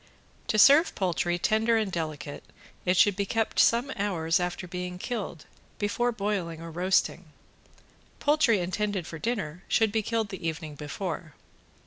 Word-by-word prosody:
To 215 Hz, -, +1 dB
serve 285 Hz, +9 st, +6 dB
poultry 175 Hz, -2 st, 0 dB
tender 220 Hz, +5 st, +2 dB
and 215 Hz, -3 st, -1 dB
delicate; 155 Hz, -4 st, -4 dB, 0.4 s
it 180 Hz, 0 st, +2 dB
should 205 Hz, +2 st, +5 dB
be 200 Hz, 0 st, -2 dB
kept 225 Hz, +1 st, 0 dB
some 240 Hz, +4 st, +4 dB
hours 170 Hz, -5 st, 0 dB
after 180 Hz, +1 st, -3 dB
being 180 Hz, 0 st, -5 dB
killed 195 Hz, -, -5 dB, 0.3 s
before 240 Hz, +4 st, 0 dB
boiling 195 Hz, -7 st, -2 dB
or 165 Hz, 0 st, -8 dB
roasting. 180 Hz, +3 st, +1 dB, 0.9 s
Poultry 290 Hz, -6 st, +3 dB
intended 195 Hz, 0 st, -2 dB
for 160 Hz, -, -8 dB
dinner 185 Hz, -7 st, -3 dB
should 220 Hz, -2 st, +3 dB
be 220 Hz, +1 st, +1 dB
killed 225 Hz, 0 st, -1 dB
the 190 Hz, -4 st, -5 dB
evening 160 Hz, -1 st, -4 dB
before. 155 Hz, +2 st, -5 dB
190 Hz, 145 wpm, -28 LUFS, 170-220 Hz, 0.9 s, serve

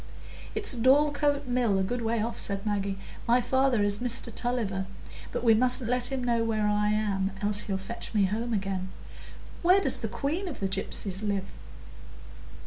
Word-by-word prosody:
"It's 425 Hz, -7 st, +1 dB
Dorlcote 285 Hz, +3 st, +3 dB
Mill, 245 Hz, -5 st, +1 dB
a 190 Hz, -, +1 dB
good 240 Hz, +5 st, -2 dB
way 225 Hz, -1 st, 0 dB
off," 230 Hz, +1 st, -4 dB
said 200 Hz, 0 st, -1 dB
Maggie. 200 Hz, -2 st, -1 dB, 0.3 s
"My 240 Hz, +2 st, +5 dB
father 255 Hz, -2 st, +2 dB
is 205 Hz, 0 st, 0 dB
Mr 240 Hz, -1 st, -3 dB
Tulliver, 215 Hz, -7 st, -1 dB, 0.4 s
but -, -, -3 dB
we 230 Hz, -2 st, +6 dB
mustn't 250 Hz, +1 st, +3 dB
let 250 Hz, +1 st, +1 dB
him 265 Hz, -2 st, -2 dB
know 235 Hz, -1 st, +1 dB
where 220 Hz, -2 st, 0 dB
I 210 Hz, 0 st, +1 dB
am, 205 Hz, -2 st, 0 dB
else 205 Hz, 0 st, +4 dB
he'll 195 Hz, -2 st, -2 dB
fetch 195 Hz, +5 st, -6 dB
me 205 Hz, -3 st, +3 dB
home 225 Hz, +5 st, -2 dB
again. 195 Hz, -3 st, -2 dB, 0.7 s
Where 365 Hz, +3 st, +5 dB
does -, -, +3 dB
the -, -, -3 dB
queen 325 Hz, +8 st, -3 dB
of 320 Hz, -, -6 dB
the 195 Hz, -, 0 dB
gypsies 195 Hz, 0 st, -2 dB
live?" 200 Hz, -2 st, -1 dB
225 Hz, 175 wpm, -28 LUFS, 200-250 Hz, 0.7 s, we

